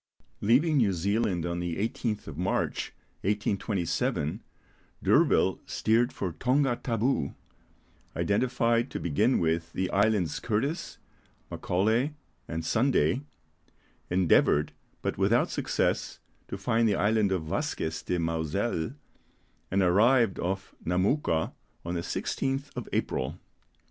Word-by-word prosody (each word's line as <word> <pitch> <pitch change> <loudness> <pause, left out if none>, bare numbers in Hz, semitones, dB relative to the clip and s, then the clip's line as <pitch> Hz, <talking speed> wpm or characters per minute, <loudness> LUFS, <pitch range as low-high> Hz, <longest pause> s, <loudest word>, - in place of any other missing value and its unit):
Leaving 145 +9 +3
New 110 -7 +3
Zealand 95 -1 0
on 85 0 -2
the 85 -1 -2
18th 110 +1 -2
of 80 - -8
March, 90 +5 -1 0.3
1827, 95 -6 -1 0.6
D'Urville - - +3
steered 115 +3 +2
for 95 - -3
Tonga 130 - +1
Tabou, 115 - -1 0.8
identified 120 +2 +1
to - - -4
begin 90 - +2
with 85 0 0
the 95 -1 -1
islands 100 -5 +2
Curtis, 140 - -2 0.5
Macaulay, 110 +11 +1 0.3
and 80 0 -4
Sunday; 125 +5 +2 0.9
endeavoured, 85 -4 +3 0.3
but - - -2
without - - +3
success, - - -1 0.3
to - - -5
find 115 +3 +2
the 100 - +2
island 105 -1 +2
of 90 -4 0
Vasquez 80 0 -2
de 90 - -1
Mauzelle, 80 - -1 0.7
and 95 +1 +2
arrived 110 +4 +4
off 95 +2 -3
Namouka 90 - +1 0.3
on 85 - -3
the 85 - -1
16th 135 +9 -2
of 125 -3 -5
April. 70 +6 -1
100 Hz, 115 wpm, -28 LUFS, 85-120 Hz, 0.9 s, arrived